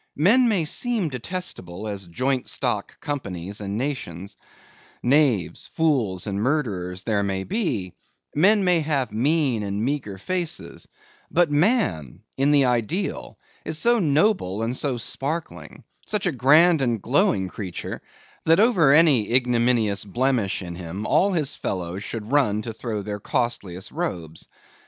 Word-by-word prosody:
Men 230 - +5
may 190 -7 +2
seem 215 +1 -1
detestable 115 - -5
as 100 -3 -5
joint 130 +8 -1
stock 120 -6 -2
companies 100 - -5
and 100 +1 -3
nations; 100 - -4 0.7
knaves, 125 - +2
fools, 125 - +1
and 100 -1 -2
murderers 100 -10 -1
there 105 -1 0
may 95 -1 -2
be; 125 - -2 0.4
men 200 +7 +4
may 180 -2 +3
have 145 -6 -1
mean 130 +1 +1
and 100 +2 -2
meagre 130 -8 -3
faces; 175 - -4 0.4
but 170 -3 +2
man, 145 - +1
in 135 +2 +2
the 145 -2 +5
ideal, 125 - -2 0.3
is 160 - -4
so 235 +7 +3
noble 150 - +1
and 120 +2 -2
so 130 -2 -1
sparkling, 150 +7 -5 0.2
such 210 -2 -1
a 180 - +2
grand 150 +5 +5
and 120 -4 0
glowing 95 -1 +2
creature, 90 -2 -6 0.4
that 165 +3 +5
over 200 - +5
any 140 -8 +5
ignominious 120 -4 +2
blemish 115 -2 0
in 85 -1 -6
him 90 +4 -6
all 200 - +3
his 150 -5 -1
fellows 90 +1 -4
should 110 +2 -6
run 110 -8 +2
to 115 - -5
throw 110 -2 -4
their 105 0 -5
costliest 105 -6 -2
robes. 90 - -4
125 Hz, 140 wpm, -23 LUFS, 100-155 Hz, 0.7 s, Men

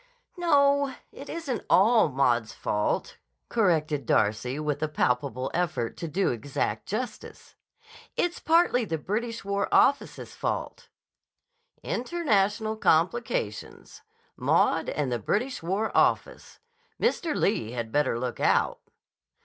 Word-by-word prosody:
"No; 280 -5 +3 0.2
it 280 - -11
isn't 290 -9 -4
all 220 -1 +5
Maud's 120 -5 +1
fault," 105 0 -2 0.3
corrected 155 - +1
Darcy 110 +6 +1
with 150 -1 -2
a 155 - +1
palpable 130 -2 -1
effort 165 -9 -1
to 170 - -5
do 185 +5 0
exact 115 -3 -3
justice. 215 +2 -6 0.6
"It's 350 0 0
partly 325 -7 +3
the 165 -7 -2
British 225 +7 -3
War 200 0 -1
Office's 280 - +2
fault." - - -4 0.9
"International 220 - 0
complications. 165 - -1 0.3
Maud - - +2
and 140 -3 -2
the 120 - -1
British 245 - -1
War 195 +6 -2
Office. - - +1 0.4
Mr. 345 -9 0
Lee 120 - 0
had 120 -2 -4
better 145 -4 +1
look 125 0 -4
out!" - - +2
185 Hz, 115 wpm, -27 LUFS, -, 0.9 s, all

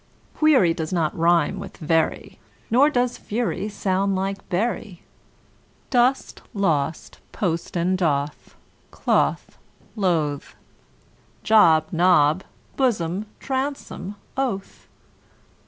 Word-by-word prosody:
Query 265 - +4
does 160 -1 -4
not 165 -4 0
rime 170 +3 +2
with - - -9
very, 160 0 -1 0.3
Nor 270 +6 +5
does 245 -3 0
fury 215 -1 -2
sound 195 -1 0
like 195 +1 -4
bury. 200 -1 -2 0.9
Dost, 250 +1 +1
lost, 160 -6 -1
post 170 -2 -2
and 185 +2 0
doth, 145 -4 -2 0.3
cloth, - - 0 0.4
loth; 160 -8 -1 0.9
Job, 160 -8 +5
Job, 170 -1 +4 0.3
blossom, 205 -6 0 0.3
bosom, 265 -7 -4 0.2
oath. 245 -8 -4
185 Hz, 90 wpm, -23 LUFS, 165-220 Hz, 0.9 s, Nor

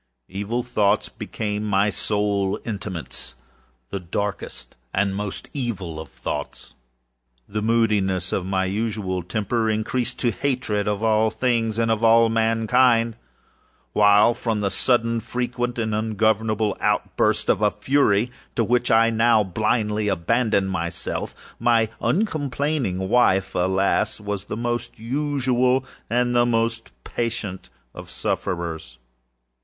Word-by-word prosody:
Evil 105 +5 -2
thoughts 105 -4 +1
became 105 -1 -4
my 105 0 +2
sole 100 -2 0
intimatesâthe 85 - -6 0.7
darkest 100 +2 -4 0.2
and 95 0 +1
most 105 -1 -5
evil 100 - -4
of 80 - -8
thoughts. - - -6 0.7
The 105 +1 -3
moodiness 105 -5 +1
of 95 - 0
my 95 0 0
usual 100 -2 -2
temper 110 +5 -1
increased 120 +3 -1
to 120 - +2
hatred 110 -3 -1
of 105 +1 -1
all 110 0 +3
things 115 -2 0
and 115 -1 +2
of 110 0 0
all 115 0 +6
mankind; 115 +1 +3 0.8
while, 105 +2 +5
from 115 -3 -2
the 100 -1 0
sudden, 115 -2 +1
frequent, 120 +1 -3
and 110 -2 -1
ungovernable 110 0 +1
outbursts - - +1
of - - +2
a 105 - +4
fury 115 0 +2 0.2
to 115 - +2
which 120 +2 +1
I 115 0 +5
now 115 -1 +4
blindly 105 +2 0
abandoned 100 +1 +1
myself, 85 -1 -3 0.2
my 115 -2 +3
uncomplaining 145 - 0
wife, 95 -4 +3
alas, 95 +4 +1
was 105 -1 -4
the 105 - -5
most 120 0 -3
usual 130 0 +1 0.2
and 120 +1 +1
the 120 0 +4
most 115 -1 0
patient 110 -5 -4 0.2
of - - -10
sufferers. 80 -7 -3
110 Hz, 120 wpm, -23 LUFS, 100-120 Hz, 0.8 s, all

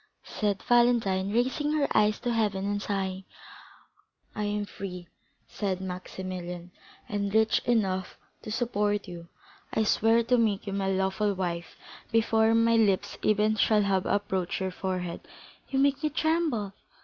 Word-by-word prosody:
said 205 -2 -2
Valentine, 230 -6 +3
raising 260 +6 0
her 295 -2 +2
eyes 210 0 +3
to 245 -1 -1
heaven 205 -4 0
and 205 0 -1
sighing. 190 -2 -2 1.1
"I 210 - -2
am 205 0 -1
free," 180 -3 -7 0.4
replied 195 -3 -2
Maximilian, 180 -1 -6 0.4
"and 200 -1 -2
rich 220 +1 +3
enough 195 -6 0 0.2
to 215 - -7
support 210 -3 0
you. 170 -1 -9 0.4
I 220 - +1
swear 225 +2 +3
to 245 +1 +2
make 210 -3 +1
you 200 - -4
my 195 -1 -1
lawful 190 +2 0
wife 170 -2 -4 0.4
before 225 0 +3
my 230 0 +4
lips 205 -2 +1
even 215 +1 +2
shall 210 0 +3
have 195 -2 +1
approached 190 -3 -1
your 190 -1 -2
forehead." 180 -2 -4 0.5
"You 270 - -1
make 280 +1 +3
me 305 - +1
tremble!" 310 - 0
205 Hz, 145 wpm, -28 LUFS, 190-225 Hz, 1.1 s, my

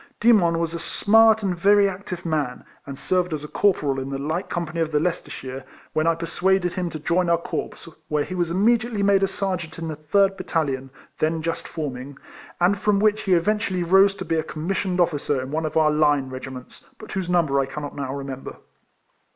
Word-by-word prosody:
Demon 200 -8 +4
was 165 0 -1
a 170 - -4
smart 220 +5 +4
and 190 -3 0
very 200 +3 +4
active 185 -2 -6
man, 150 -6 -2 0.2
and 140 -1 -7
serving 180 +2 0
as 150 -1 -4
corporal 150 -6 +1
in 135 0 -5
tlie 140 +1 -4
light 175 +5 -2
company 170 -1 -3
of 160 -1 -1
the 150 - +2
Leicestershire 135 -6 -4 0.3
when 155 +1 +1
T 165 - +3
persuaded 175 +2 0
him 180 -2 -2
to 160 - -6
join 170 +3 0
our 170 - +4
corps, 170 - -5 0.2
where 150 -1 0
he 185 - -7
was 175 -2 -1
immediately 220 +3 +1
made 200 -1 +4
a 195 - +3
sergeant 185 -4 -3
in 165 -1 -4
the 155 - -4
3rd 195 +6 +2
battalion, 135 -7 -2 0.3
then 160 +1 0
just 165 0 -3
forming; 140 -3 -6 0.4
and 185 +3 +3
from 205 -1 +2
which 215 0 +2
he 190 - +1
eventually 195 0 0
rose 195 +3 +5
to 185 -2 -6
be 165 0 0
a - - -1
commissioned 180 +4 -2
officer 145 -5 +1
in 130 +1 -5
one 160 +1 -1
of 155 - -3
our 155 -1 +4
line 145 -3 +2
regiments, 130 -1 -9
but 215 - -11
whose 190 -3 -3
number 160 -6 +2
I 135 - 0
cannot 145 +1 -6
now 140 -2 -4
remember. 135 -1 -6
170 Hz, 200 wpm, -23 LUFS, 150-190 Hz, 0.4 s, rose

